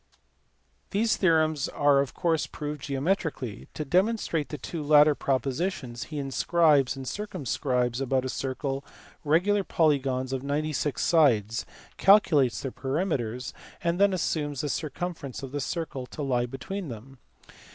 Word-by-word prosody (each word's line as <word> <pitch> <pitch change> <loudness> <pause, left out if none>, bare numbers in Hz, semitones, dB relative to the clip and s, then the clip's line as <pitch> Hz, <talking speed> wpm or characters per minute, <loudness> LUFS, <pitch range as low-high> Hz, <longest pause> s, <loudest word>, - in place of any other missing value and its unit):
These 220 +3 +2
theorems 155 -5 +2
are 145 -1 +3
of 140 -2 -1
course 165 -3 +1
proved 150 -1 -6
geometrically. 140 - -2
To 155 - -3
demonstrate 180 -2 +1
the 150 - -5
two 160 +4 -5
latter 150 0 +6
propositions, 135 -2 -2
he 155 - -7
inscribes 145 0 +2
in 135 - -7
and 130 - -7
circumscribes 125 - -1
about 130 -1 0
a - - -2
circle 135 +1 -3 0.4
regular 185 +7 +2
polygons 135 -6 +1
of 130 - -2
ninety 150 +3 -1
six 145 +1 -1
sides, 115 - +3 0.3
calculates 155 - +4
their 135 - -4
perimeters, 130 - -2 0.3
and 170 +1 0
then 200 0 +5
assumes 150 -6 -1
the 150 - -2
cir 155 +2 -2
cumference 145 -4 -5
of 135 - -6
the 145 0 -3
circle 140 -4 -4
to 150 - -6
lie 125 -3 0
between 175 +9 -5
them. 125 +2 -10
145 Hz, 145 wpm, -27 LUFS, 130-165 Hz, 0.4 s, latter